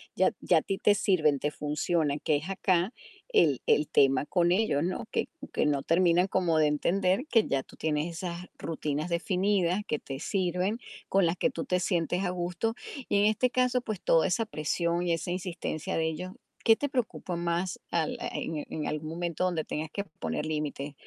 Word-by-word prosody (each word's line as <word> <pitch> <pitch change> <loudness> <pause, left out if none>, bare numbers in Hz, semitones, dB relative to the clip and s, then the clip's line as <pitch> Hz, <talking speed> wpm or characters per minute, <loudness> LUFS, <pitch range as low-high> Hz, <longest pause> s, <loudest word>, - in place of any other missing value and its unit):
ya - - +3
ya - - +3
a - - -6
ti 195 - -2
te 205 +1 +4
sirven, 155 -9 +2
te 150 - -1
funcionan, 150 0 0
que 150 0 +2
es 155 +6 -7
acá 190 +1 +1 0.4
el 150 - +3
el 150 - +3
tema 135 0 +4
con 175 +1 +2
ellos, 185 -7 +2
¿no? 180 +2 -2
Que - - 0 0.3
que - - +1
no 140 -2 +1
terminan 175 +1 +3
como 180 -4 +1
de 155 -1 +4
entender 185 - +1
que 225 -3 +4
ya 135 -1 0
tú - - -17
tienes 155 +1 -1
esas 180 0 -5
rutinas 155 0 -3
definidas 185 +2 +1
que 150 - -1
te 135 -1 -7
sirven, 185 +5 -1 0.3
con 195 -1 +4
las 165 +1 +1
que - - +2
tú 260 - -4
te 180 -6 +1
sientes 175 +1 0
a 180 - 0
gusto. 180 +5 -2 0.3
Y 200 - +3
en 205 - +4
este 220 +4 +3
caso, 250 0 +2
pues 215 -6 -5
toda 165 - +4
esa 220 +5 +1
presión 170 -1 -1
y 175 - +1
esa 165 +2 -2
insistencia 175 -3 -3
de 160 0 +1
ellos, 180 +4 -4 0.3
¿qué 225 - +7
te 285 +5 -2
preocupa 240 - -2
más 170 +1 -1
al 165 -2 0 0.2
en 155 -2 -3
en 155 - -3
algún 155 +1 -3
momento 170 +1 -2
donde 170 -3 0
tengas 155 +1 -4
que 200 - -3 0.2
poner 150 - -2
límites? 150 -2 -3
175 Hz, 195 wpm, -29 LUFS, 155-190 Hz, 0.4 s, qué